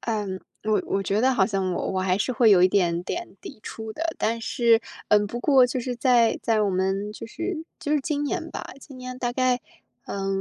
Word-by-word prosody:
嗯， 205 Hz, -4 st, -2 dB, 0.2 s
我 215 Hz, -1 st, +2 dB
我 195 Hz, -, 0 dB
觉 200 Hz, +2 st, 0 dB
得 260 Hz, +1 st, +4 dB
好 195 Hz, -, +4 dB
像 190 Hz, -2 st, -1 dB
我 -, -, -2 dB
我 185 Hz, -, 0 dB
还 185 Hz, 0 st, +1 dB
是 235 Hz, +5 st, -1 dB
会 230 Hz, -1 st, +4 dB
有 180 Hz, -3 st, +6 dB
一 185 Hz, -, +6 dB
点 175 Hz, -3 st, +1 dB
点 345 Hz, -, -5 dB
抵 290 Hz, -, -10 dB
触 220 Hz, -1 st, -7 dB
的， 315 Hz, -, -6 dB, 0.2 s
但 230 Hz, +1 st, 0 dB
是， 230 Hz, 0 st, +3 dB, 0.3 s
嗯， 210 Hz, 0 st, +4 dB
不 235 Hz, -, -5 dB
过 265 Hz, -3 st, +5 dB
就 255 Hz, +1 st, -3 dB
是 250 Hz, 0 st, -3 dB
在 240 Hz, -2 st, +3 dB
在 220 Hz, -2 st, +2 dB
我 200 Hz, -, +1 dB
们， 195 Hz, +3 st, -1 dB
就 215 Hz, -, -8 dB
是 335 Hz, +5 st, -4 dB, 0.2 s
就 300 Hz, -3 st, -2 dB
是 300 Hz, -, +3 dB
今 290 Hz, +1 st, -2 dB
年 335 Hz, +2 st, -3 dB
吧， -, -, -6 dB, 0.2 s
今 275 Hz, -2 st, -12 dB
年 255 Hz, 0 st, -7 dB
大 245 Hz, -1 st, -1 dB
概， 250 Hz, 0 st, +1 dB, 0.5 s
呃， 195 Hz, -1 st, -3 dB
230 Hz, 240 characters per minute, -25 LUFS, 200-255 Hz, 0.5 s, 有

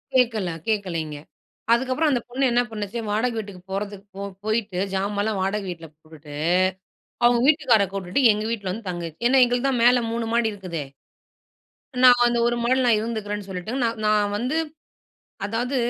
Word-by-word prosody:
கேட்கல, 225 Hz, -7 st, +2 dB, 0.2 s
கேட்கலைங்க. 170 Hz, -8 st, -2 dB, 0.6 s
அதுக்கப்பறம் 265 Hz, +6 st, +1 dB
அந்த 245 Hz, -3 st, +1 dB
பொண்ணு 260 Hz, +3 st, -2 dB
என்ன 240 Hz, +1 st, +3 dB
பண்ணுச்சு, 210 Hz, +1 st, -4 dB
வாடகை 230 Hz, +3 st, 0 dB
வீட்டுக்கு 200 Hz, -4 st, -6 dB
போறதுக்கு 200 Hz, 0 st, -5 dB
போ 200 Hz, -, -4 dB, 0.2 s
போய்ட்டு 215 Hz, -4 st, -1 dB, 0.2 s
ஜாமான்லாம் 205 Hz, +1 st, -1 dB
வாடகை 195 Hz, +2 st, -1 dB
வீட்ல 165 Hz, -2 st, -7 dB
போட்டுட்டு, 155 Hz, -2 st, -13 dB, 0.9 s
அவங்க 240 Hz, 0 st, +5 dB
வீட்டுக்காரர 260 Hz, -10 st, +4 dB
கூப்பிட்டுட்டு 195 Hz, +6 st, +2 dB
எங்க 210 Hz, +1 st, -3 dB
வீட்ல 200 Hz, -5 st, -3 dB
வந்து 215 Hz, +2 st, -7 dB
தங்கிச்சு. 170 Hz, -3 st, -6 dB
ஏன்னா 260 Hz, +1 st, +5 dB
எங்களுக்கு 245 Hz, +2 st, 0 dB
தான் 250 Hz, -3 st, 0 dB
மேல 245 Hz, 0 st, +5 dB
3 230 Hz, 0 st, -2 dB
மாடி 235 Hz, -2 st, +2 dB
இருக்குதே! 180 Hz, -7 st, -5 dB, 1.2 s
நான் 250 Hz, -1 st, +7 dB
அந்த 240 Hz, 0 st, +1 dB
ஒரு 240 Hz, -, +1 dB
மாடில 255 Hz, +2 st, +2 dB
நான் 225 Hz, -3 st, +5 dB
இருந்துக்கிறேன்னு 210 Hz, -3 st, -4 dB
சொல்லிட்டு, 185 Hz, +3 st, -5 dB
நான் 230 Hz, -1 st, -1 dB
நான் 210 Hz, -1 st, +2 dB
வந்து 250 Hz, +8 st, -1 dB, 0.9 s
அதாவது 240 Hz, +6 st, -2 dB
215 Hz, 155 wpm, -23 LUFS, 195-240 Hz, 1.2 s, நான்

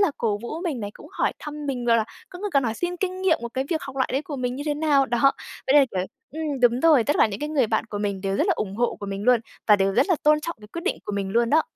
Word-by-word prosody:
là 400 Hz, -6 st, +4 dB
cổ 210 Hz, -3 st, 0 dB
vũ 310 Hz, +7 st, -5 dB
mình 290 Hz, -9 st, -2 dB
này 205 Hz, -, -4 dB
cũng -, -, -13 dB
hỏi -, -, 0 dB
thăm 300 Hz, 0 st, -7 dB
mình, 250 Hz, -3 st, -2 dB
rồi 230 Hz, -1 st, +4 dB
là 220 Hz, -, +1 dB, 0.2 s
có 360 Hz, -, -10 dB
người 410 Hz, +2 st, -3 dB
còn 275 Hz, -2 st, +4 dB
hỏi 225 Hz, -1 st, -1 dB
xin 355 Hz, +4 st, -3 dB
kinh 370 Hz, 0 st, -3 dB
nghiệm 340 Hz, -4 st, +3 dB
một 235 Hz, -, -3 dB
cái 265 Hz, -, 0 dB
việc 315 Hz, -, 0 dB
học 270 Hz, 0 st, -8 dB
lại 260 Hz, -, +1 dB
đấy 275 Hz, +3 st, 0 dB
của 290 Hz, -2 st, -6 dB
mình 250 Hz, 0 st, -2 dB
như 285 Hz, -, -4 dB
thế 295 Hz, -, +1 dB
nào, 290 Hz, -3 st, +3 dB
đó. 240 Hz, +3 st, +3 dB, 0.3 s
Với 265 Hz, -, +3 dB
lại 280 Hz, -2 st, +7 dB
kiểu -, -, +2 dB, 0.3 s
ừm, 300 Hz, -4 st, -3 dB
đúng 245 Hz, +1 st, +4 dB
rồi, 305 Hz, -8 st, +5 dB
tất 290 Hz, -, +1 dB
cả -, -, +6 dB
những 205 Hz, -2 st, -6 dB
cái 295 Hz, -, -2 dB
người 280 Hz, -6 st, +2 dB
bạn 220 Hz, +1 st, 0 dB
của 205 Hz, -, -3 dB
mình 200 Hz, -2 st, -2 dB
đều 195 Hz, 0 st, -1 dB
rất 335 Hz, -, +2 dB
là 380 Hz, -, +4 dB
ủng 200 Hz, -1 st, -3 dB
hộ 240 Hz, +1 st, 0 dB
của 200 Hz, -, -5 dB
mình 195 Hz, 0 st, -4 dB
luôn 250 Hz, -2 st, +5 dB, 0.3 s
và 210 Hz, -, +7 dB
đều 195 Hz, 0 st, +1 dB
rất -, -, +3 dB
là 360 Hz, -, +3 dB
tôn 300 Hz, 0 st, +4 dB
trọng 335 Hz, -1 st, -5 dB
cái 210 Hz, -, -13 dB
quyết 335 Hz, -, -5 dB
định 400 Hz, -, 0 dB
của 205 Hz, -, -4 dB
mình 195 Hz, -1 st, -2 dB
luôn 235 Hz, 0 st, +2 dB
đó. 315 Hz, +1 st, +5 dB
265 Hz, 330 wpm, -24 LUFS, 225-305 Hz, 0.3 s, lại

